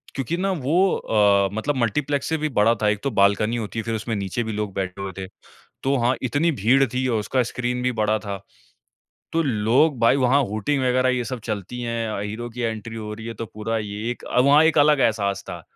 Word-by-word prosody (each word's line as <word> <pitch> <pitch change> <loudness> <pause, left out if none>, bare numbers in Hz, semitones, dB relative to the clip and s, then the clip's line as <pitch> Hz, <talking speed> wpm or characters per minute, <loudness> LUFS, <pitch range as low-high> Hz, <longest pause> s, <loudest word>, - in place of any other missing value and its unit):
क्योंकि 135 +6 -2
ना 195 +1 0
वो 155 -2 -1 0.2
अ, 100 -2 +3
मतलब 135 +7 -1
मल्टीप्लेक्स 140 +5 0
से 160 - +1
भी 155 0 -2
बड़ा 110 +3 +4
था। 105 - +2
एक 105 -1 0
तो 140 - -1
बाल्कनी 100 +3 +3
होती 115 0 -4
है - - -3
फिर 115 -1 -2
उसमें 110 +1 -3
नीचे 100 +4 -2
भी 110 - -4
लोग 105 -2 -3
बैठे 95 0 -3
हुए 95 -1 -4
थे। 95 -1 -5 0.6
तो 135 +1 +2
हाँ 125 +2 +3
इतनी 145 +7 +1
भीड़ 130 +6 +4
थी 130 0 0
और 115 -3 +1
उसका 125 +4 0
स्क्रीन 125 +1 -3
भी 125 - +1
बड़ा 110 -1 +1
था। 100 -2 -5 1.0
तो 165 0 +2
लोग 125 +3 +2
भाई 115 +4 +5
वो 130 -2 +2 0.2
हूटिंग 130 +7 -1
वगैरह 130 +1 +2
ये 125 -1 -1
सब 120 +1 -5
चलती 105 +3 -4
है। 115 -1 -2
अ, - - -3
हीरो 110 +4 -5
की 125 +2 -8
एंट्री 115 0 -4
हो 105 -1 -6
रही 110 +1 -9
है 115 - -5
तो 115 - -6
पूरा 110 +2 -3
ये 105 +2 -4
एक - - -13
अ, 125 - +1
वहाँ 145 +4 +6
एक 160 -1 +3
अलग 145 -1 +5
एहसास 100 -4 +1
था। - - -7
115 Hz, 230 wpm, -23 LUFS, 105-130 Hz, 1.0 s, वहाँ